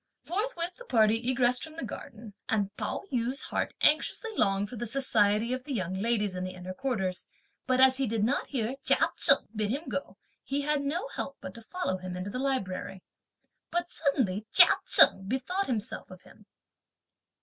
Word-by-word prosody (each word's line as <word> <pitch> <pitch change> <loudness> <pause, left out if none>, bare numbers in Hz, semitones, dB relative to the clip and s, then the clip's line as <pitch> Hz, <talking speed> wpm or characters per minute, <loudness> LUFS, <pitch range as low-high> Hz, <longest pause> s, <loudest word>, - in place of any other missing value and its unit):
Forthwith 360 -2 -3
the - - -12
party 225 -1 +3
egressed 250 -1 +2
from 315 -1 -8
the 330 - -6
garden, 215 0 -9 0.2
and 205 -2 -1
Pao - - -4
yü's 250 +3 -1
heart - - -3
anxiously 320 +8 +2
longed 195 - +1
for 245 - -9
the 240 +1 -4
society 220 -2 +1
of 255 0 -4
the 285 0 -5
young 185 -4 -2
ladies 210 0 0
in 180 0 -4
the 185 0 -5
inner 180 +1 -7
quarters, 190 -6 -3 0.4
but 255 0 +2
as 260 0 +6
he 270 -1 0
did 220 -1 -1
not 260 +6 0
hear 250 -1 -2
Chia - - +3
Cheng - - +6
bid 210 -1 -1
him 285 +8 -3
go, 280 - -5 0.3
he 280 +1 -2
had 295 0 0
no 315 - -2
help 275 - -5
but 185 - -8
to 230 - -12
follow 230 - -3
him 180 0 -6
into 185 +3 -5
the 250 - -4
library. 195 -8 -3 0.7
But 345 +1 -2
suddenly 220 - -1
Chia - - +8
Cheng 195 0 +6
bethought 270 - -2
himself 225 -4 -3
of 185 0 -13
him. 210 -1 -19
235 Hz, 185 wpm, -29 LUFS, 205-275 Hz, 0.7 s, Chia